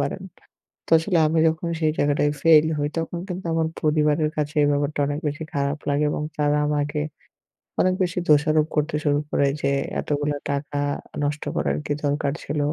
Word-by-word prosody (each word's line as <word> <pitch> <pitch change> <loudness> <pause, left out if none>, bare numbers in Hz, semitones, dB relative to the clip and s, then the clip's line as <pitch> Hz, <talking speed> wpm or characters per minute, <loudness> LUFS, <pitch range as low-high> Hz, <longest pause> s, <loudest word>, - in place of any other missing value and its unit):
পারেন। - - -2 0.6
তো - - -14
আসলে 170 +1 0
আমি 160 +1 +1
যখন 160 +2 -2
সেই 155 -1 +3
জায়গাটায় 145 0 +2
ফেইল 160 -2 +6
হই, 145 - 0
তখন 170 +1 -3
কিন্তু 180 +1 -5
আমার 160 -1 +1 0.2
পরিবারের 150 0 +2
কাছে 150 0 -2
এই - - +4
ব্যাপারটা 145 +1 0
অনেক 145 +1 -2
বেশি 145 +2 -5
খারাপ 140 +1 0
লাগে 145 +1 +2
এবং 150 - -2
তারা 150 0 +2
আমাকে 150 0 -1 0.8
অনেক 185 0 +3
বেশি 180 0 -1
দোষারোপ 155 +1 +4
করতে 150 +1 0
শুরু 145 -1 +2
করে 140 - +2
যে 140 - +1 0.3
"এতগুলা 145 0 -1
টাকা 145 0 -2 0.4
নষ্ট 145 +1 -2
করার 70 +1 0
কি - - 0
দরকার 145 0 0
ছিল? 145 +1 -3
150 Hz, 175 wpm, -23 LUFS, 145-155 Hz, 0.8 s, ফেইল